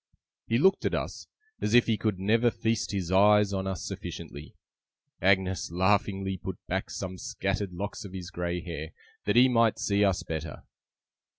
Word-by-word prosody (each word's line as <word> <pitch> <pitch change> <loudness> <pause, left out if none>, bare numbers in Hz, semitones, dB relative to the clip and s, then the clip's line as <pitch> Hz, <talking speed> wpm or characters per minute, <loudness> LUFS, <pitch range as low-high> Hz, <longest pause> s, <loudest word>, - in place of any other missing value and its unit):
He 115 - +2
looked 190 +9 +4
at - - +1
us, - - -4 0.3
as 105 - +1
if 120 - +7
he 115 - +2
could 105 -2 -1
never 110 +5 +3
feast 115 -1 -1
his 95 -4 -3
eyes 105 +1 +5
on 95 0 -2
us 95 -2 -4
sufficiently. 75 +2 -7 0.7
Agnes 95 -2 +2
laughingly 95 +1 +1
put - - -6
back - - -2
some 95 -1 -5
scattered 100 0 -2
locks 100 +4 -5
of 100 - -9
his 90 -2 -7
grey 90 0 -3
hair, 85 -2 -6 0.3
that - - +1
he 125 +2 +7
might 115 -3 +3
see 100 0 +1
us 95 -3 +1
better. 80 -1 -5
95 Hz, 170 wpm, -28 LUFS, 90-105 Hz, 0.7 s, if